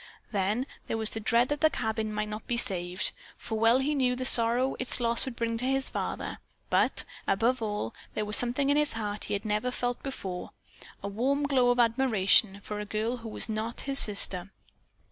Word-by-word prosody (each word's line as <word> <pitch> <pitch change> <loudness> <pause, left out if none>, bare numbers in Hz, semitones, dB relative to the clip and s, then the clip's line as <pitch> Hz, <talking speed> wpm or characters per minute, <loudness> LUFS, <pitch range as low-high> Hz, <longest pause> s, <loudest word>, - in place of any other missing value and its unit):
Then 210 +4 0 0.2
there 225 - -2
was 220 -1 +2
the 225 - -4
dread 235 +3 +2
that 295 0 -2
the 315 - +6
cabin 220 -4 -2
might 210 0 -2
not 215 +1 -7
be 240 - 0
saved, 180 -3 +1 0.3
for 220 -1 -4
well 225 +2 +5
he 275 +3 0
knew 255 -3 +1
the 255 +1 -3
sorrow 245 +2 +3
its 255 0 +1
loss 235 -1 +2
would 260 -3 -6
bring 230 -1 -2
to 250 - -3
his 270 0 0
father, - - -4 0.3
but, - - +2 0.2
above 230 +5 +1
all, 210 - -3 0.2
there 215 - -1
was 210 0 -1
something 250 +5 +1
in 290 - +3
his 300 -1 +2
heart 210 -2 -3
he 205 - -1
had 200 - -5
never 215 +4 0
felt 245 -1 -3
before, 190 -10 -6 0.5
a - - -2
warm 260 +8 0
glow 265 -4 +3
of 245 - +2
admiration 225 -4 +3
for 210 0 -5
a - - -3
girl 220 +4 -2
who 230 -1 -8
was - - +1
not 220 +1 -3
his 275 0 +2
sister. 195 -3 +3
230 Hz, 205 wpm, -28 LUFS, 210-255 Hz, 0.5 s, the